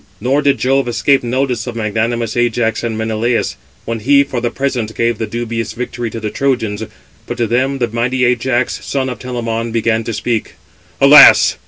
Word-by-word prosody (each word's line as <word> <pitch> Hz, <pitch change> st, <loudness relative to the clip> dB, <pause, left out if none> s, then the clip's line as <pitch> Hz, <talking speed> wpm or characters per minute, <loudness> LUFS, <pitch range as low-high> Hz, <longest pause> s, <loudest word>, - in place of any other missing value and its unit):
Nor 130 Hz, +6 st, +1 dB
did 140 Hz, -2 st, +2 dB
Jove 135 Hz, 0 st, +1 dB
escape 135 Hz, +3 st, +2 dB
notice 125 Hz, 0 st, -2 dB
of 120 Hz, -, -5 dB
magnanimous 115 Hz, +1 st, -2 dB
Ajax 120 Hz, -1 st, 0 dB
and 115 Hz, -2 st, -3 dB
Menelaus, 110 Hz, +2 st, -1 dB, 0.3 s
when 115 Hz, 0 st, -3 dB
he 140 Hz, +5 st, +4 dB
for 130 Hz, -3 st, -4 dB
the 120 Hz, -, 0 dB
present 125 Hz, -5 st, -3 dB
gave 115 Hz, -1 st, 0 dB
the 110 Hz, -, -2 dB
dubious 115 Hz, 0 st, -4 dB
victory 120 Hz, -1 st, -4 dB
to 115 Hz, -, -6 dB
the 105 Hz, -1 st, -4 dB
Trojans; 120 Hz, -6 st, -1 dB, 0.5 s
but 120 Hz, -, -5 dB
to 120 Hz, -, +1 dB
them 130 Hz, +4 st, 0 dB
the 120 Hz, -2 st, 0 dB
mighty 120 Hz, +3 st, 0 dB
Ajax, 125 Hz, 0 st, 0 dB
son 135 Hz, -1 st, -2 dB
of 125 Hz, -, -6 dB
Telamon, 115 Hz, -2 st, -4 dB
began 115 Hz, 0 st, 0 dB
to 115 Hz, -, -4 dB
speak: 115 Hz, +1 st, -3 dB, 0.4 s
"Alas! -, -, +8 dB
120 Hz, 180 wpm, -15 LUFS, 115-125 Hz, 0.5 s, Alas